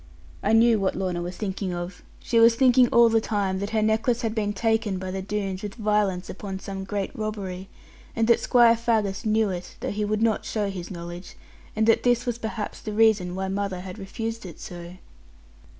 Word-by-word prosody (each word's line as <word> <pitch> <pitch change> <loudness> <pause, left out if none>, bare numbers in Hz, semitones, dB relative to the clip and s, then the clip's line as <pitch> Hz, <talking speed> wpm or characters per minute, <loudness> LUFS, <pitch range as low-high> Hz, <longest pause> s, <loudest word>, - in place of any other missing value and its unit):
I 210 - +1
knew 225 0 +5
what 195 -1 0
Lorna 180 -2 -2
was 175 +1 -5
thinking 190 -3 -3
of; 175 +1 -6 0.2
she 230 - +1
was 230 0 +7
thinking 250 0 +5
all 235 0 +6
the 225 -1 +3
time 200 -4 -1
that 200 +1 -3
her 220 -1 +1
necklace 225 +3 +1
had 225 -1 -1
been 210 -2 -1
taken 220 -1 0
by 185 0 -5
the 190 0 -3
Doones 195 -1 -3
with 205 -1 -6
violence 210 -5 0
upon 195 0 -6
some 195 0 -6
great 200 -1 -3
robbery; 195 -4 -5 0.5
and 225 -1 +1
that 235 - +5
Squire 235 -2 +5
Faggus 225 -3 0
knew 215 -1 +2
it, 180 -1 -6
though - - -3
he 210 +1 -2
would 215 +1 0
not 225 -2 +1
show 205 -2 -2
his 180 -3 -7
knowledge; 175 0 -8 0.4
and 220 0 +2
that 225 - +4
this 245 -1 +2
was 240 -1 -2
perhaps 220 -1 -5
the 215 - -5
reason 210 -5 +3
why 190 0 -2
mother 195 -1 -2
had 185 +3 -8
refused 225 +4 -5
it 175 -4 -10
so. 175 0 -8
210 Hz, 205 wpm, -25 LUFS, 190-225 Hz, 0.5 s, was